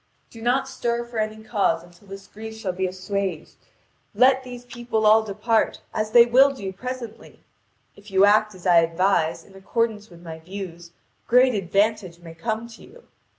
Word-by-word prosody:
Do 230 - -12
not 245 +4 +1
stir 235 -3 -2
for 235 -1 -6
any 215 0 -3
cause 195 -7 0
until 175 +3 -19
this 195 0 -10
grief 220 +2 -10
shall 215 -4 -3
be 185 +1 -2
assuaged; 185 -2 -4 0.6
let 260 +1 +4
these 245 -1 -10
people 240 -2 -3
all 215 +1 +6
depart, 220 +2 0
as 215 0 -2
they 235 +1 +7
will 260 +4 +5
do 195 -6 -6
presently. 250 +2 -8 0.5
If 205 +1 -16
you 195 0 +5
act 215 0 +3
as 185 - -15
I 175 -2 +5
advise, 165 0 +1
in 195 - -19
accordance 215 +2 -2
with 170 -1 -16
my 160 -1 -8
views, 175 -1 -9 0.4
great 250 +1 +5
advantage 200 -1 0
may 170 -1 -12
come 220 +6 -4
to 230 - -14
you. 480 +4 -16
210 Hz, 175 wpm, -23 LUFS, 185-235 Hz, 0.6 s, they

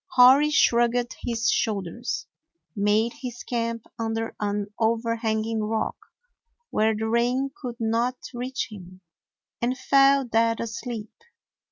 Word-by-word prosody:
Hori 265 +3 +7
shrugged 240 -3 +3
his 235 0 -1
shoulders, 215 +2 -2 0.5
made 210 +3 +2
his 245 -2 -6
camp 230 -1 -2
under 225 0 -2
an 205 0 -2
overhanging 225 -1 0
rock, 220 0 -1 0.8
where 220 +1 +2
the 220 +1 -2
rain 245 +4 +1
could 245 -3 -6
not 230 +3 +1 0.2
reach 250 +2 -3
him, 185 -2 -11 0.6
and 250 +2 0
fell 275 0 +4
dead 230 -1 +2
asleep. 230 -1 -5
230 Hz, 115 wpm, -25 LUFS, 220-245 Hz, 0.8 s, Hori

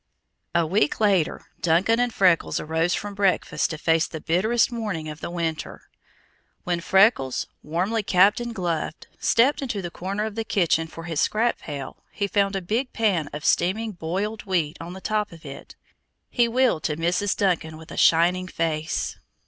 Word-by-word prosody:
A 170 -1 +3
week 165 -2 +1
later, 195 -7 +1 0.2
Duncan 180 +8 +3
and 245 0 +1
Freckles 185 -6 +2
arose 160 +3 0
from 205 0 -5
breakfast 195 -2 +1
to 160 - -4
face 160 +1 +2
the 160 - -7
bitterest 215 +11 +2
morning 210 -10 -3
of 150 0 -8
the - - -4
winter. 165 -2 -4 0.7
When 175 -1 -1
Freckles, 190 - +3 0.2
warmly 185 +9 -1
capped 195 +2 +4
and 240 -1 -5
gloved, 170 -5 -3
stepped 270 +2 +2
to 210 - -2
the 175 -3 -5
corner 195 +5 -3
of 220 - -4
the 225 +1 -3
kitchen 175 -7 +1
for 165 +1 -10
his 165 -3 -2
scrap 230 +3 +1
pail, 140 -3 -7
he 200 - -2
found 200 0 +1
a 195 - -2
big 230 +8 -1
pan 195 -9 +1
of 150 +1 -7
steaming 215 +5 +1
boiled 195 +5 -3
wheat 165 -6 0
on 170 +2 -7
the 190 - -9
top 210 0 -1
of 165 -2 -14
it. 140 -1 -10 0.6
He 240 -2 +3
wheeled 245 -7 +2
to 150 - -1
Mrs. 180 +4 0
Duncan 165 -5 0
with 160 0 -13
a - - -7
shining 175 +3 +4
face. 160 -3 -2
180 Hz, 175 wpm, -24 LUFS, 165-210 Hz, 0.7 s, capped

